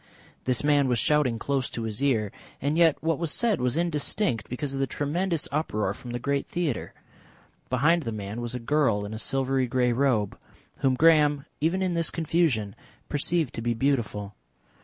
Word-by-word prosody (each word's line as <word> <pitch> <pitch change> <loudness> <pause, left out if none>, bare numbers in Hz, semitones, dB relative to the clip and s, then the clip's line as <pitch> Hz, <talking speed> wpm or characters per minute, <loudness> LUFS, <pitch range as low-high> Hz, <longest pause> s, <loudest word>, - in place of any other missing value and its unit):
This 125 0 +1
man 145 -2 +3
was 125 -2 +1
shouting 145 -3 +2
close 135 +2 -1
to 115 - -5
his 110 +1 -3
ear 115 -8 +1 0.3
and 145 +3 0
yet 165 -2 +4
what 160 -2 +1
was 170 -2 -1
said 230 - +1
was 125 +3 0
indistinct 165 - 0
because 135 +3 -4
of 135 - -3
the 135 - +1
tremendous 165 +4 -1
uproar 110 -10 -1
from 125 +3 -10
the 120 - -2
great 140 +3 -1
theatre. 170 -8 -3 0.7
Behind 150 +7 +3
the 115 -6 -4
man 105 +2 -5
was 120 +1 -4
a - - -3
girl 115 -5 +1
in 105 - -6
a 110 - -5
silvery 135 +1 0
grey 125 0 +1
robe, 120 -6 +1 0.4
whom 130 -1 +2
Graham, 150 -2 +4
even 170 +5 +1
in 185 -2 0
this 165 -1 +1
confusion, 155 - 0 0.4
perceived 150 0 0
to 115 - -5
be 120 0 0
beautiful. 115 -6 -1
135 Hz, 180 wpm, -26 LUFS, 120-155 Hz, 0.7 s, yet